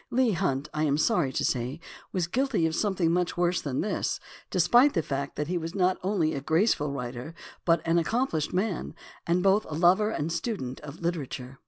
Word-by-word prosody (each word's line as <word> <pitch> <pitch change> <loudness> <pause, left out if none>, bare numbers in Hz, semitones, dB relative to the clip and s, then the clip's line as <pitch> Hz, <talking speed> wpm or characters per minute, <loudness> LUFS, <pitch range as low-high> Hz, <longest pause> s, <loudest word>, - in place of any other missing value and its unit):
Leigh 250 -2 +2
Hunt, 155 -7 -1
I 155 0 0
am 145 -1 +2
sorry 165 - +2
to - - 0
say, 125 +4 -1 0.3
was 180 -3 0
guilty 245 -1 0
of 160 - 0
some 200 +3 0
thing 170 -3 +2
much 175 0 0
worse 175 0 +1
than 135 -3 -2
this, 200 0 -1 0.3
despite 240 - +4
the 165 - +1
fact 140 0 -3
that 150 - -2
he 175 +1 -1
was 165 +3 -6
not 185 -1 +2
only 180 -5 +1
a 135 - -3
graceful 160 0 +2
writer, 125 +3 -6 0.3
but 165 -2 +2
an 165 +1 +3
accomplished 170 - 0
man, 185 -3 -2 0.3
and 175 +2 +2
both 195 +2 +4
a 155 - -6
lover 185 +6 +4
and 165 -6 -2
student 165 - -3
of 150 +2 -10
literature. 135 -6 -4
170 Hz, 200 wpm, -27 LUFS, 150-190 Hz, 0.3 s, despite